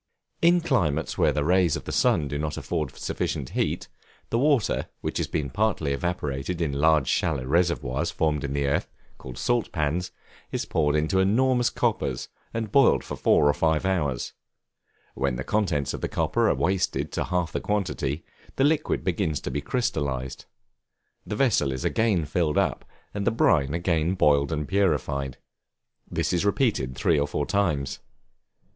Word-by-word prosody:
In 175 Hz, +1 st, +5 dB
climates 85 Hz, -, 0 dB
where -, -, +3 dB
the 75 Hz, -, -1 dB
rays 90 Hz, 0 st, +3 dB
of -, -, -5 dB
the -, -, -6 dB
sun 75 Hz, -, +2 dB
do 70 Hz, +1 st, -3 dB
not 75 Hz, 0 st, -3 dB
afford 75 Hz, -4 st, -3 dB
sufficient 65 Hz, -4 st, -3 dB
heat, -, -, -1 dB, 0.4 s
the 115 Hz, -, +2 dB
water, 140 Hz, -4 st, +2 dB
which -, -, -2 dB
has -, -, -1 dB
been 70 Hz, -3 st, -2 dB
partly 100 Hz, -9 st, 0 dB
evaporated 75 Hz, 0 st, -3 dB
in 80 Hz, -4 st, 0 dB
large 75 Hz, -1 st, +3 dB
shallow 70 Hz, -6 st, 0 dB
reservoirs 85 Hz, -1 st, +1 dB
formed 75 Hz, -4 st, 0 dB
in 70 Hz, -1 st, -3 dB
the 70 Hz, 0 st, 0 dB
earth, 70 Hz, -, 0 dB, 0.3 s
called 65 Hz, -1 st, -9 dB
salt 120 Hz, -, 0 dB
pans, 85 Hz, +2 st, -1 dB, 0.4 s
is -, -, -2 dB
poured 75 Hz, -2 st, +1 dB
into 80 Hz, +5 st, +1 dB
enormous 120 Hz, +5 st, +3 dB
coppers 65 Hz, -3 st, -1 dB, 0.2 s
and 115 Hz, -3 st, -3 dB
boiled 140 Hz, +3 st, +5 dB
for -, -, -6 dB
four 75 Hz, -, +3 dB
or 75 Hz, -, +4 dB
five 80 Hz, +2 st, +1 dB
hours: 75 Hz, -10 st, -1 dB, 0.8 s
when 70 Hz, -2 st, -1 dB
the 65 Hz, -, -4 dB
contents 90 Hz, -9 st, 0 dB
of -, -, -5 dB
the -, -, -2 dB
copper -, -, +1 dB
are -, -, +2 dB
wasted 85 Hz, -6 st, 0 dB
to -, -, -2 dB
half 90 Hz, -2 st, -1 dB
the -, -, -3 dB
quantity, 90 Hz, -7 st, -2 dB, 0.3 s
the 135 Hz, -, +2 dB
liquid 150 Hz, +1 st, +1 dB
begins 85 Hz, -5 st, 0 dB
to -, -, -4 dB
be 75 Hz, -, -2 dB
crystallized; 70 Hz, -, -2 dB, 0.8 s
the -, -, -3 dB
vessel 105 Hz, -, +2 dB
is 65 Hz, -1 st, -4 dB
again 105 Hz, -8 st, +1 dB
filled 75 Hz, 0 st, 0 dB
up, -, -, +1 dB, 0.3 s
and 100 Hz, -1 st, -3 dB
the -, -, +7 dB
brine 80 Hz, -10 st, +2 dB
again 85 Hz, 0 st, +1 dB
boiled 70 Hz, -4 st, +3 dB
and 75 Hz, -2 st, -2 dB
purified: 70 Hz, -8 st, 0 dB, 0.7 s
this -, -, -1 dB
is 85 Hz, -, +1 dB
repeated 100 Hz, -, +1 dB
three 80 Hz, +2 st, +2 dB
or 70 Hz, -, +1 dB
four 75 Hz, 0 st, -2 dB
times. 75 Hz, -9 st, 0 dB
80 Hz, 170 wpm, -26 LUFS, 70-100 Hz, 0.8 s, the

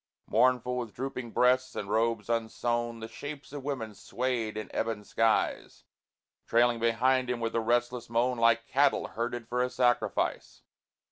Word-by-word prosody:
Mournful, 125 Hz, +1 st, +2 dB
with 115 Hz, -4 st, -6 dB
drooping 125 Hz, -2 st, -4 dB
breasts 130 Hz, +2 st, +2 dB
and 100 Hz, -, -4 dB
robes 115 Hz, +1 st, 0 dB
unsewn 115 Hz, 0 st, -1 dB
The 110 Hz, -, -5 dB
shapes 145 Hz, +3 st, -8 dB
of 145 Hz, -2 st, -6 dB
women 125 Hz, -6 st, -4 dB
swayed 115 Hz, 0 st, -2 dB
in 110 Hz, -, -4 dB
ebon 110 Hz, -2 st, -1 dB
skies, 115 Hz, +1 st, 0 dB, 0.6 s
Trailing 120 Hz, 0 st, +3 dB
behind 125 Hz, +3 st, +2 dB
him 125 Hz, -1 st, -1 dB
with 115 Hz, -1 st, -2 dB
a 115 Hz, -, +2 dB
restless 120 Hz, +1 st, 0 dB
moan 120 Hz, +1 st, +1 dB
Like 115 Hz, 0 st, +4 dB
cattle 140 Hz, +1 st, +2 dB
herded 120 Hz, 0 st, -4 dB
for 125 Hz, +1 st, 0 dB
a 125 Hz, -, +1 dB
sacrifice. 120 Hz, -1 st, 0 dB
120 Hz, 150 wpm, -29 LUFS, 115-125 Hz, 0.6 s, Like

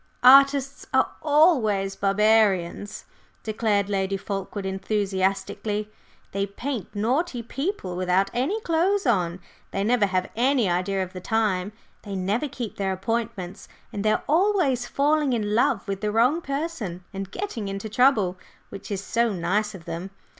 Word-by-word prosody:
"Artists 275 Hz, +1 st, +6 dB
are 265 Hz, -, +3 dB
always 255 Hz, -, +3 dB
barbarians," 205 Hz, -2 st, +2 dB, 0.4 s
declared 215 Hz, -2 st, 0 dB
Lady 195 Hz, -1 st, -1 dB
Fulkeward 195 Hz, 0 st, -5 dB
enthusiastically. 195 Hz, +1 st, -1 dB, 0.4 s
"They 195 Hz, +1 st, -1 dB
paint 235 Hz, +1 st, -4 dB
naughty 245 Hz, +5 st, 0 dB
people 270 Hz, -, -3 dB
without 185 Hz, +2 st, +1 dB
any 280 Hz, -, 0 dB
clothes 365 Hz, +3 st, +1 dB
on; 180 Hz, -7 st, +1 dB, 0.3 s
they 195 Hz, -, -2 dB
never 220 Hz, -1 st, +3 dB
have 185 Hz, -1 st, -1 dB
any 250 Hz, -1 st, +2 dB
idea 185 Hz, +2 st, 0 dB
of 185 Hz, 0 st, -9 dB
time; 205 Hz, -2 st, 0 dB, 0.3 s
they 200 Hz, -2 st, -6 dB
never 200 Hz, +10 st, -1 dB
keep 245 Hz, -5 st, -6 dB
their 195 Hz, -1 st, -1 dB
appointments; 200 Hz, -2 st, -4 dB, 0.3 s
and 200 Hz, -, -3 dB
they 215 Hz, -, +3 dB
are -, -, -1 dB
always 320 Hz, -, +2 dB
falling 295 Hz, -1 st, +2 dB
in 210 Hz, -3 st, -1 dB
love 225 Hz, -2 st, +2 dB
with 195 Hz, -1 st, -3 dB
the 210 Hz, -1 st, 0 dB
wrong 250 Hz, +10 st, +3 dB
person 275 Hz, -, -4 dB
and 195 Hz, -1 st, -5 dB
getting 240 Hz, -, -4 dB
into 195 Hz, +2 st, -4 dB
trouble, 215 Hz, -6 st, +2 dB, 0.3 s
which 195 Hz, -, -9 dB
is 200 Hz, -2 st, -3 dB
so 230 Hz, +2 st, +1 dB
nice 200 Hz, +3 st, -1 dB
of 170 Hz, -3 st, -12 dB
them! 170 Hz, +4 st, -5 dB
210 Hz, 145 wpm, -25 LUFS, 195-255 Hz, 0.4 s, Artists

